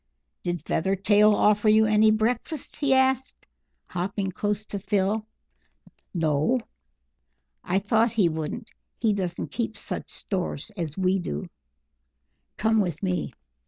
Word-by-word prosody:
"Did 175 -3 -3
Feathertail 200 +4 +3
offer 210 +1 +3
you 220 +1 +6
any 215 0 +5
breakfast?" 235 +7 -1
he 285 -2 +1
asked, 265 0 +2 0.4
hopping 190 +2 -3
close 205 +3 -2
to 205 - -4
Phil. 210 +2 0 0.8
"No." 160 - +1 1.0
"I 180 - 0
thought 220 +4 +2
he 210 -6 +4
wouldn't. 160 +8 -4 0.3
He 220 -2 +2
doesn't 180 -3 -3
keep 225 -3 -3
such - - -5
stores 185 -1 -3
as 165 -5 -4
we 190 0 +2
do. 75 - -5 1.1
Come 220 0 +3
with 180 -1 -3
me." 180 -8 -1
205 Hz, 125 wpm, -26 LUFS, 180-220 Hz, 1.1 s, you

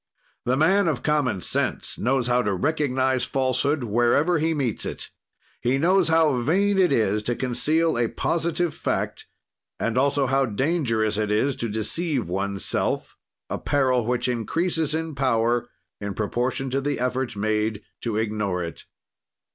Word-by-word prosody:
"The 130 +2 +1
man 190 +6 +4
of 145 -7 -1
common 145 - +1
sense - - -1
knows 130 +1 +1
how 125 0 +2
to 100 -4 0
recognize 130 - 0
falsehood 135 +2 0
wherever 120 +9 +2
he 160 +2 +1
meets 130 -7 -1
it; - - -6 0.5
he 125 +3 +1
knows 180 +4 +3
how 160 -4 +3
vain 195 +9 +2
it 180 -5 +4
is 105 -5 +2
to 120 +3 -1
conceal 150 +7 +1
a 120 - +2
positive 165 +6 -1
fact - - -3 0.5
and 115 +2 0
also 140 0 +2
how 135 +1 +2
dangerous 115 -4 0
it 105 -1 0
is 120 +6 +1
to 115 - -2
deceive 120 - -1
oneself, 100 +2 -2 0.3
a - - -4
peril 130 -4 +1
which 120 +2 0
increases 155 - 0
in 160 0 -3
power, 120 -3 +1 0.3
in 100 -1 -5
proportion 125 +5 -2
to 135 +1 0
the 145 +1 -2
effort 125 -1 -1
made 105 0 -1 0.2
to 115 -3 -2
ignore 105 -5 -1
it. 85 -2 -8
130 Hz, 150 wpm, -24 LUFS, 110-150 Hz, 0.5 s, man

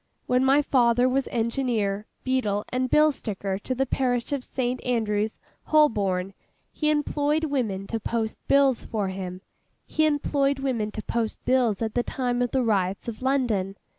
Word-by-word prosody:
When 250 +1 +2
my 275 +2 +4
father 245 -2 +3
was 265 +1 0
Engineer, 225 -4 -1 0.2
Beadle, 215 -6 0
and 255 0 -1
Bill 305 +2 +5
Sticker 200 -7 -4
to 255 +5 -3
the 270 +2 +1
parish 245 -1 -1
of 280 -3 -1
St. 255 -1 -2
Andrew's, 220 -3 0 0.3
Holborn, 200 -11 +2 0.4
he 305 - 0
employed 295 +1 +1
women 235 -10 -1
to 225 +2 -3
post 225 0 -2
bills 275 -3 +4
for 205 -4 -2
him. 185 -1 -6 0.4
He 315 0 +2
employed 280 -2 +1
women 250 -6 -1
to 215 - -5
post 230 -2 -3
bills 240 -5 +2
at 220 -1 -2
the 245 - +2
time 245 0 -2
of 245 - +1
the 260 0 +1
riots 195 -3 0
of 230 -1 -6
London. 240 -8 0
245 Hz, 165 wpm, -25 LUFS, 210-270 Hz, 0.4 s, Bill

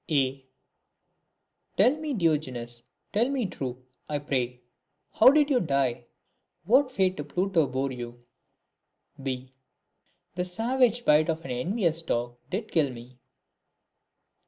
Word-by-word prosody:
A. 135 -3 +1 1.3
Tell 255 - +5
me, 305 -3 -3
Diogenes, 130 - -1 0.3
tell 230 +5 +2
me 270 -4 0
true, 130 -8 -5 0.2
I 150 - 0
pray, 125 -4 -2 0.5
How 225 - +7
did 295 +1 +4
you 255 - +4
die; 135 - 0 0.6
what 260 +5 +4
fate 190 -5 +1
to 150 - -3
Pluto 175 0 +1
bore 135 +1 -2
you? 120 -1 -7 1.0
£. 130 -1 -4 0.8
The 180 +1 -1
savage 240 +5 +1
bite 150 +2 +5
of 165 0 -2
an 135 - -5
envious 165 - 0
dog 120 -5 -2
did 210 +6 -4
kill 155 -4 +3
me. 125 0 -11
150 Hz, 125 wpm, -27 LUFS, 130-210 Hz, 1.3 s, How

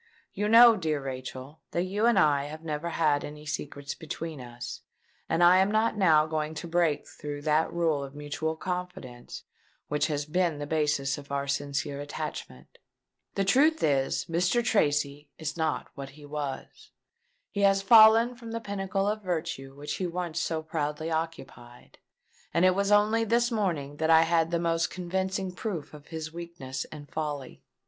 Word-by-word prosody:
You 210 +1 -1
know, 230 0 +8
dear 155 -5 -1
Rachel, 130 +2 -7
that 175 - +1
you 205 +5 0
and 235 -4 +4
I 145 -5 +3
have 155 +2 -8
never 155 +1 -3
had 150 -3 +1
any 150 +1 -8
secrets 145 -1 -5
between 160 -2 -6
us; 120 0 -8 0.5
and 165 +2 +2
I 175 +1 +7
am 190 +1 +3
not 220 +1 +2
now 160 -7 +5
going 155 0 -3
to 170 - -6
break 165 -3 +1
through 145 -1 -7
that 155 +1 +2
rule 165 -4 0
of 140 +1 -9
mutual 150 +2 -3
confidence 180 -8 -6 0.5
which 150 +1 +1
has 145 -2 -2
been 170 0 0
the 145 - -4
basis 145 -3 0
of 140 0 -13
our 140 0 -1
sincere 140 0 -2
attachment. 65 - -7 0.6
The 195 - +1
truth 300 +10 +4
is, 135 -3 +1
Mr. 180 +8 +1
Tracy 145 -7 +1
is 155 -2 -4
not 160 -2 -2
what 140 -1 -7
he 145 +2 -14
was. 145 -2 -6 0.6
He 200 - -2
has 195 0 +4
fallen 225 +3 +7
from 235 -2 -9
the 230 - -2
pinnacle 195 -2 -2
of 215 +1 -1
virtue 160 -7 -4
which 150 +1 -5
he 185 - -1
once 170 -1 -3
so 160 -1 -2
proudly 155 0 -3
occupied; 135 -7 -6 0.6
and 170 - +4
it 185 - +5
was 200 +2 0
only 210 +2 +4
this 235 +2 +2
morning 165 -10 -1
that 160 +1 0
I 160 0 +7
had 165 -1 +2
the 170 - 0
most 165 0 0
convincing 190 +1 -2
proof 180 -7 -5
of 150 -1 -13
his 160 -1 -6
weakness 170 -7 -6
and 145 -2 -11
folly! 145 -4 -5
160 Hz, 170 wpm, -28 LUFS, 145-185 Hz, 0.6 s, know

